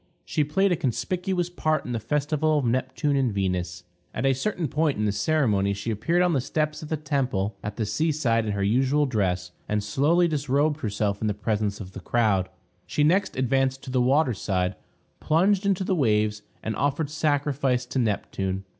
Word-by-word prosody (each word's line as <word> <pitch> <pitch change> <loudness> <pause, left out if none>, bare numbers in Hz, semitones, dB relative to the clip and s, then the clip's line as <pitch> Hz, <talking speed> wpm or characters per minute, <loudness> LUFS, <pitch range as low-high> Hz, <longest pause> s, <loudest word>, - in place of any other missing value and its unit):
She 150 - 0
played 190 +7 +1
a - - +3
conspicuous 175 - -1
part 155 -3 0
in 125 - -4
the 115 - -1
festival 150 +4 0
of 140 - 0
Neptune 130 +4 0
and 130 -4 +2
Venus. 90 -3 -2 0.3
At - - -1
a 135 - +4
certain 170 +4 -2
point 150 +1 0
in 105 - 0
the 105 - +2
ceremony 105 -4 +1
she 105 +4 -3
appeared 165 - +1
on 180 -1 +2
the 135 - +2
steps 155 +3 -2
of 155 - -8
the 155 - -1
temple 130 -9 -1
at 105 0 -4
the 110 - -1
sea 155 +10 0
side 120 -7 +1
in 105 - -1
her 100 -1 -1
usual 130 +8 +2
dress, 95 -8 -1 0.2
and 105 0 0
slowly 150 +12 +2
disrobed 145 0 +1
herself 100 -2 -1
in 110 - 0
the 105 - 0
presence 105 -1 -1
of 95 -3 -8
the 95 - -8
crowd. 100 -3 +1 0.4
She 145 - +1
next 180 +3 +2
advanced 135 +1 +1
to 130 - -7
the 130 -1 +2
water 135 +1 +3
side, 95 -2 -1 0.5
plunged 190 +5 +2
into 195 -1 +1
the 190 - 0
waves, 105 - +1 0.2
and 110 - -2
offered 145 +3 -1
sacrifice 145 -4 0
to 125 +2 -2
Neptune. 95 -4 -1
130 Hz, 195 wpm, -25 LUFS, 105-155 Hz, 0.5 s, a